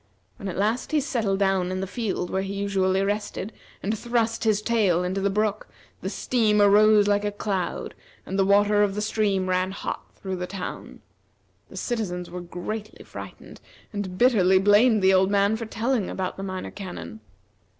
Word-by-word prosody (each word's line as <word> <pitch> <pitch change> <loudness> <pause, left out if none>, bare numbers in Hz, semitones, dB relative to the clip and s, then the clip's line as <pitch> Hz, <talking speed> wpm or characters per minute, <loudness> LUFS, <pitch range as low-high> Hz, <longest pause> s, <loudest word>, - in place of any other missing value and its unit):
When 200 - -6
at 180 - -4
last 220 +9 0
he 305 - +4
settled 230 -8 -1
down 195 -2 +2
in 185 - -2
the - - -3
little 190 - -3
field 210 -7 -2
where 190 - 0
he 195 +1 -4
usually 195 -1 +1
rested, 205 +1 -3 0.3
and 210 +3 0
thrust 230 0 -1
his 215 -2 +3
tail 210 -6 +2
into 185 +2 -2
the 200 - +2
brook, 210 +1 -1 0.3
the - - -3
steam 220 -4 +1
arose 205 +1 +6
like 205 0 +2
a 205 - -1
cloud, 200 -3 -3 0.3
and 190 +1 -3
the - - +5
water 205 +1 +4
of 200 -1 +1
the 210 - -2
stream 205 -3 0
ran 185 0 +1
hot 190 - -5
through 190 -1 -5
the 180 0 -4
town. 185 -1 -7 0.7
The - - -11
citizens 180 -7 -3
were 180 0 -5
greatly 205 +5 -6
frightened, - - -10 0.3
and 195 -3 -4
bitterly 195 -6 +5
blamed 205 +2 +4
the 190 0 +6
old 190 0 +4
man 200 +1 +3
for 225 0 -5
telling 230 -1 -1
about 185 -1 -3
the - - -7
Minor 185 -1 -5
Canon. 180 - -8
200 Hz, 185 wpm, -25 LUFS, 190-215 Hz, 0.7 s, arose